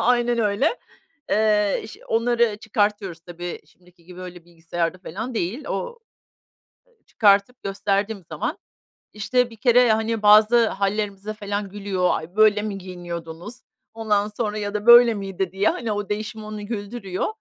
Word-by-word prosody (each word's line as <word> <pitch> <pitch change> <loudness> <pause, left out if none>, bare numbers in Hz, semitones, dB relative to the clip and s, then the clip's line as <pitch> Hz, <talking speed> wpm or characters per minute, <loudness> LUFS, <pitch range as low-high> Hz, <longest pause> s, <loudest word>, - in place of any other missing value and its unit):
aynen 240 0 +2
öyle, 225 - +1 0.5
eee, 210 -2 +2
iş 215 - -10
onları 230 -1 +2
çıkartıyoruz. 205 -5 -1
Tabii, 175 0 -7
şimdiki 180 -1 -25
gibi 180 +1 -12
öyle 175 -2 -9
bilgisayarda 170 +1 -4
falan 215 +7 -6
değil. 225 - -3
O 485 -1 -4 0.9
ııı, 475 -3 -35
çıkartıp 205 +3 +2
gösterdiğim 200 0 -2
zaman, - - -3 0.5
işte, 240 +4 0
bir 225 - -13
kere, 240 0 +4
hani, 220 0 -1
bazı 215 +2 +6
hâllerimize 200 +1 -2
falan 205 -1 -4
gülüyor, 195 -2 -1
"Ay, 170 +5 -5
böyle 215 -1 +5
mi 205 -2 -4
giyiniyordunuz," 175 +1 -8 0.4
ondan 210 -2 0
sonra 210 0 -3
ya 205 0 -4
da 210 +2 -3
"Böyle 235 -1 +8
miydi?" 195 -2 -4
diye, 195 +2 +2
hani, 225 -3 -2
o 205 -1 -3
değişim 215 +1 -4
onu 210 -1 -7
güldürüyor. 205 -3 -4
210 Hz, 145 wpm, -23 LUFS, 190-220 Hz, 0.9 s, Böyle